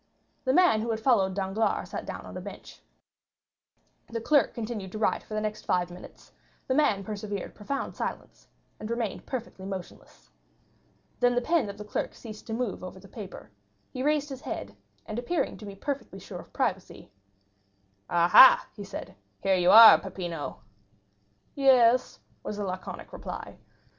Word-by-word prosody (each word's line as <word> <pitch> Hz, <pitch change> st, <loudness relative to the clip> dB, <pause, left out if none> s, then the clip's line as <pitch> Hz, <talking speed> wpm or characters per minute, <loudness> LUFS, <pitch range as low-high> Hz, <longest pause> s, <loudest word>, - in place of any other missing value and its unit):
The 260 Hz, -, +3 dB
man 350 Hz, -10 st, +5 dB
who 230 Hz, -, -3 dB
had 220 Hz, -1 st, -1 dB
followed 205 Hz, -6 st, +2 dB
Danglars 195 Hz, +3 st, -1 dB
sat -, -, -5 dB
down -, -, -6 dB
on -, -, -10 dB
a -, -, -5 dB
bench. -, -, -10 dB, 1.3 s
The 230 Hz, -, -3 dB
clerk 285 Hz, +5 st, +2 dB
continued 220 Hz, -5 st, -5 dB
to -, -, -4 dB
write 215 Hz, -, +1 dB
for 215 Hz, -, -8 dB
the 215 Hz, -, 0 dB
next 215 Hz, 0 st, -4 dB
five 180 Hz, -1 st, 0 dB
minutes; 180 Hz, -, -13 dB, 0.3 s
the 260 Hz, -, 0 dB
man 240 Hz, -9 st, +2 dB
preserved 205 Hz, -1 st, -5 dB
profound 275 Hz, +6 st, -4 dB
silence, -, -, -6 dB, 0.3 s
and 215 Hz, -, -6 dB
remained 235 Hz, -3 st, -3 dB
perfectly 240 Hz, -7 st, -6 dB
motionless. 190 Hz, -2 st, -9 dB, 0.9 s
Then 245 Hz, 0 st, +3 dB
the 245 Hz, -, +2 dB
pen 310 Hz, -5 st, +1 dB
of 200 Hz, -, -8 dB
the 210 Hz, -, -8 dB
clerk 210 Hz, -, -3 dB
ceased 215 Hz, -3 st, -10 dB
to 225 Hz, -, -4 dB
move 230 Hz, -5 st, -3 dB
over 185 Hz, +1 st, -8 dB
the 195 Hz, -, -15 dB
paper; 190 Hz, -, -10 dB, 0.4 s
he 255 Hz, -, -5 dB
raised 295 Hz, +1 st, +1 dB
his 270 Hz, -1 st, -7 dB
head, 100 Hz, 0 st, -6 dB, 0.3 s
and 215 Hz, -, -4 dB
appearing 320 Hz, +7 st, -1 dB
to 210 Hz, -, -10 dB
be 200 Hz, -, -8 dB
perfectly 265 Hz, -2 st, -5 dB
sure 195 Hz, -, -9 dB
of -, -, -13 dB
privacy: -, -, -3 dB, 1.0 s
"Ah, 170 Hz, 0 st, +3 dB
ha," 260 Hz, +8 st, +9 dB
he 205 Hz, -, -7 dB
said, 195 Hz, -, -8 dB, 0.3 s
"here 195 Hz, -, +3 dB
you 180 Hz, -1 st, +3 dB
are, 225 Hz, +2 st, +11 dB
Peppino!" 175 Hz, -5 st, -6 dB, 0.9 s
"Yes," 255 Hz, -3 st, +4 dB, 0.2 s
was 210 Hz, -, -5 dB
the 205 Hz, -, -2 dB
laconic 185 Hz, 0 st, -6 dB
reply. -, -, -7 dB
215 Hz, 170 wpm, -28 LUFS, 190-245 Hz, 1.3 s, are